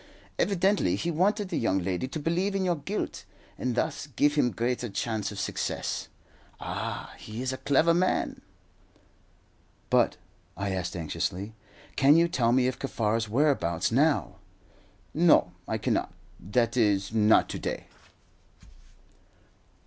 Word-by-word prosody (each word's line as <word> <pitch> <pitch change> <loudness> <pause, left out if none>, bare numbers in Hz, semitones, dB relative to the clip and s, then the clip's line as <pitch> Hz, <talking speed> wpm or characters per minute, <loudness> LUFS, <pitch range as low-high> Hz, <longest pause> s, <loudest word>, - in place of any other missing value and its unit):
Evidently 190 - +2
he 170 - -2
wanted 200 +4 +1
the - - -1
young 95 -4 +1
lady 95 +6 -2
to 135 - -5
believe 180 +6 0
in 190 -1 0
your 175 -2 +1
guilt, 190 +9 -4 0.3
and 125 -2 -2
thus 145 - -2
give 145 +2 +2
him 145 -5 +3
greater 120 +3 -2
chance 110 +1 -2
of 100 - -7
success. - - -3 0.5
Ah, - - -5
he 110 +2 -8
is 130 0 -1
a - - -4
clever 155 +4 +3
man." 185 +2 0 1.5
"But," - - +3 0.4
I 100 0 -2
asked 90 -1 -3
anxiously, 90 +5 -3 0.4
"can 140 +3 +6
you 170 +1 +4
tell 120 -8 +1
me 125 0 +3
Kaffar's 115 -4 -1
whereabouts 110 - +1
now?" 125 - +2 0.8
"No, - - +4 0.2
I - - -1
cannot - - -1 0.3
that 115 +4 0
is, 105 -4 +2
not 110 -1 +4
to - - -4
day." - - -4
125 Hz, 135 wpm, -28 LUFS, 105-155 Hz, 1.5 s, can